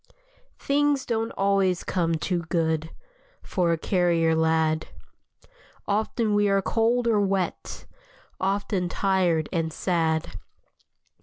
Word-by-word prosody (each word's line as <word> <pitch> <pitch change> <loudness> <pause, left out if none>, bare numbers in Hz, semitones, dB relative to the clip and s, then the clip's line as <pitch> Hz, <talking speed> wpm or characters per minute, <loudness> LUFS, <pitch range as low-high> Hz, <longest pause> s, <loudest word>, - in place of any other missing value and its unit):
Things 285 -1 +1
don't 225 -1 -1
always 195 -2 +1
come 165 -3 0
too 175 +3 -1
good 160 -2 0 0.5
For 175 -3 0
a 165 - +1
carrier 170 -2 +1
lad. 160 0 +1 1.0
Often 215 +1 0
we 205 0 +3
are 195 0 +3
cold 235 +4 +1
or 220 -3 +3
wet, 195 -2 -2 0.5
Often 195 -1 -1
tired 180 -5 +1
and 165 -2 -1
sad. 160 -2 -1
185 Hz, 105 wpm, -25 LUFS, 165-205 Hz, 1.0 s, we